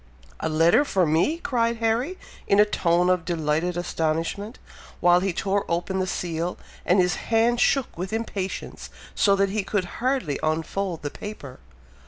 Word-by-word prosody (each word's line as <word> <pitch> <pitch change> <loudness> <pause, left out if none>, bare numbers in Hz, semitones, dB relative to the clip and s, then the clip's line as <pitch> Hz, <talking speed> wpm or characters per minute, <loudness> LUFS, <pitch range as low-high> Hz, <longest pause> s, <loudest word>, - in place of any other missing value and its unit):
"A - - -2
letter 165 - +4
for 190 -10 +1
me!!" 165 - +2
cried 235 -7 0
Harry, 230 +10 0 0.3
in 200 - +4
a 210 - +8
tone 175 -3 +1
of 180 -2 +2
delighted 165 +1 -1
astonishment, 170 +6 -2 0.4
while 175 0 +5
he 190 +1 0
tore 195 +3 0
open 175 +3 -1
the 185 - 0
seal, 170 -1 -3 0.3
and 180 - +4
his 180 -2 +2
hand 230 +1 +3
shook 270 -1 +2
with 185 +2 -5
impatience, 215 -4 -4 0.2
so 200 -1 +3
that 195 0 +2
he 210 0 -1
could 195 -1 -1 0.2
hardly 255 - 0
unfold 165 +2 -2
the 145 - -3
paper. 145 -11 -9
185 Hz, 160 wpm, -24 LUFS, 170-215 Hz, 0.4 s, a